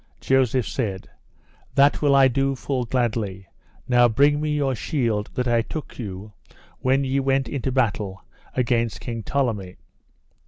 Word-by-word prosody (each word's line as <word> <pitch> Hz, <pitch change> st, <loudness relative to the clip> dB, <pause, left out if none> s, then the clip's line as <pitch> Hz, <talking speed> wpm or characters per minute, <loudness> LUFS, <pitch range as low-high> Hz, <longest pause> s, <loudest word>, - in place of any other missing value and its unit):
Joseph 130 Hz, -4 st, +2 dB
said: 95 Hz, -2 st, -4 dB, 0.6 s
That 140 Hz, +1 st, +4 dB
will 145 Hz, -2 st, +4 dB
I 135 Hz, -1 st, +7 dB
do 135 Hz, +2 st, 0 dB
full 130 Hz, -1 st, -2 dB
gladly; 110 Hz, -6 st, -1 dB, 0.4 s
now 120 Hz, -1 st, +5 dB
bring 145 Hz, +5 st, +3 dB
me 155 Hz, -, -1 dB
your 140 Hz, -3 st, +1 dB
shield 115 Hz, -5 st, -1 dB
that 125 Hz, 0 st, -1 dB
I 120 Hz, -1 st, +3 dB
took 150 Hz, +5 st, -7 dB
you 105 Hz, -1 st, -7 dB, 0.5 s
when 135 Hz, +2 st, +2 dB
ye 135 Hz, +1 st, 0 dB
went 135 Hz, 0 st, +1 dB
into 135 Hz, -2 st, -2 dB
battle 105 Hz, -6 st, -1 dB, 0.3 s
against 120 Hz, -3 st, 0 dB
King 115 Hz, -2 st, -5 dB
Tolleme. 105 Hz, -8 st, -2 dB
125 Hz, 145 wpm, -23 LUFS, 110-135 Hz, 0.6 s, I